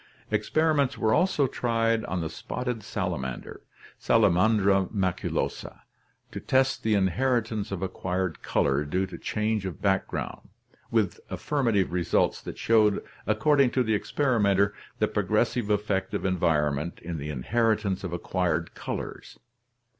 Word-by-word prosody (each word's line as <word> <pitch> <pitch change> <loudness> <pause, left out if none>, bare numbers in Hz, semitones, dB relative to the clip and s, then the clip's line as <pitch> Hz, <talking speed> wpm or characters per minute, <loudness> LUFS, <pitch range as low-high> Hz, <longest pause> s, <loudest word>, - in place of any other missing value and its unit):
Experiments 150 -4 +1
were 110 0 +2
also 175 -4 +3
tried 115 -3 0
on 95 -2 -2
the 80 - -3
spotted 125 +5 -4
salamander, 65 -9 -4 0.4
Sala 110 -4 +4
mandra 95 0 +3
maculosa, 95 -4 -2 0.5
to - - -5
test 135 +1 +1
the 110 -1 +2
inheritance 110 +2 0
of 95 -1 -3
acquired 95 -2 -2
color 70 +1 +1
due 90 +6 -1
to 95 - -9
change 105 -1 -1
of 95 -3 -5
background, 95 -1 -2 0.4
with 105 -6 +1
affirmative 115 - 0
results 90 -2 +1
that - - -8
showed, 110 -3 +3 0.2
ac 110 0 +2
cording 140 +2 +4
to 130 +1 +1
the 110 -2 0
experimenter, 100 -4 +2 0.2
the - - +2
progressive 120 -4 0
effect 105 -2 0
of - - -2
environment 80 -4 +1
in 85 -2 -4
the 75 +1 -5
inheritance 105 - 0
of 90 - -4
acquired 85 -1 -1
colors. - - -6
100 Hz, 130 wpm, -27 LUFS, 90-115 Hz, 0.5 s, Sala